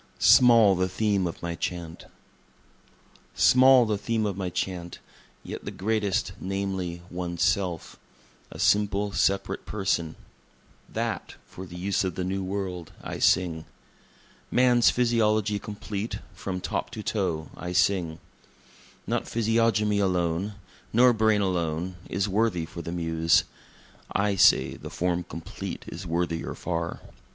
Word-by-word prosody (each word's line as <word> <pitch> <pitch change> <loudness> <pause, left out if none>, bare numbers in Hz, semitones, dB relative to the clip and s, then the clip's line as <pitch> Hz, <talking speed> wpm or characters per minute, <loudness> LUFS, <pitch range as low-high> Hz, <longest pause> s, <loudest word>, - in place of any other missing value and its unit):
Small 115 -5 +7
the 95 0 0
Theme 100 -2 +1
of 85 - -7
My 85 0 -2
Chant 85 -1 -5 1.3
Small 130 -1 +6
the 105 -2 -1
theme 110 0 -1
of 100 -3 -1
my 95 -1 -3
Chant, 90 -1 -4 0.5
yet - - -7
the - - -5
greatest 105 -1 -1
namely, 95 -3 -3
One's 85 -1 -3
Self 90 -5 -1 0.5
a - - -10
simple, 105 0 +2
separate 100 0 0
person. 95 -6 -1 0.7
That, - - -3
for 95 +1 -10
the 90 - -11
use 95 +3 0
of 95 -3 -2
the 90 - -2
New 95 +1 -2
World, 95 -3 -4
I - - -5
sing. 80 -3 +2 0.8
Man's 125 -1 +4
physiology 110 -4 +1
complete, 105 +1 -5 0.2
from 90 0 -5
top - - -3
to 110 - -6
toe, 85 -9 -2
I 90 - -6
sing. 90 -3 +1 0.9
Not - - -2
physiognomy 110 -2 +2
alone, 90 +1 0 0.4
nor 125 +2 +5
brain 110 -2 +3
alone, 90 -1 -1
is 100 +3 0
worthy 100 -4 +1
for 85 +1 -8
the 85 - -6
Muse; 80 -1 +2 0.7
I 100 0 +1
say - - +5
the - - -9
Form 90 0 -1
complete 80 0 -7
is 90 +3 -7
worthier 85 0 -2
far. 85 -1 -3
95 Hz, 130 wpm, -26 LUFS, 85-105 Hz, 1.3 s, Small